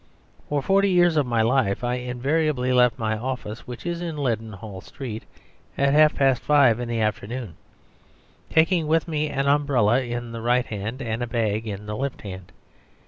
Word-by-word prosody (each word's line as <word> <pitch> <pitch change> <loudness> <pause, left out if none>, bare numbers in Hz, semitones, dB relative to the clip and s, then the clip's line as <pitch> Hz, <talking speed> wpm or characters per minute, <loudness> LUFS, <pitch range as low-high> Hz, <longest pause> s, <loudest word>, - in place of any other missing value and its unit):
For 145 -2 0
forty 195 +1 +3
years 175 -2 +4
of 145 -4 +2
my 115 -2 +2
life 115 -3 +1
I 120 0 0
invariably 130 +2 0
left 125 -1 +4
my 110 -1 -1
office, 120 -1 -5
which 125 +4 -8
is 170 0 -3
in 165 -3 -4
Leadenhall 110 -6 -4
Street, 115 -1 -7 0.5
at 140 0 +2
half 155 0 +5
past 135 -3 +2
five 140 -6 +4
in 120 -1 -4
the 115 -1 -1
afternoon, 110 -2 -3 0.9
taking 165 0 +3
with 160 +2 +2
me 155 -2 -1
an 135 -1 -1
umbrella 140 -5 +3
in 120 -1 -5
the 115 0 -6
right 120 +2 +2
hand 110 +6 -5
and 115 0 -3
a 120 - -2
bag 110 -1 -1
in 105 0 -5
the 105 0 -4
left 135 +3 -4
hand. 95 -3 -9
125 Hz, 180 wpm, -24 LUFS, 110-145 Hz, 0.9 s, half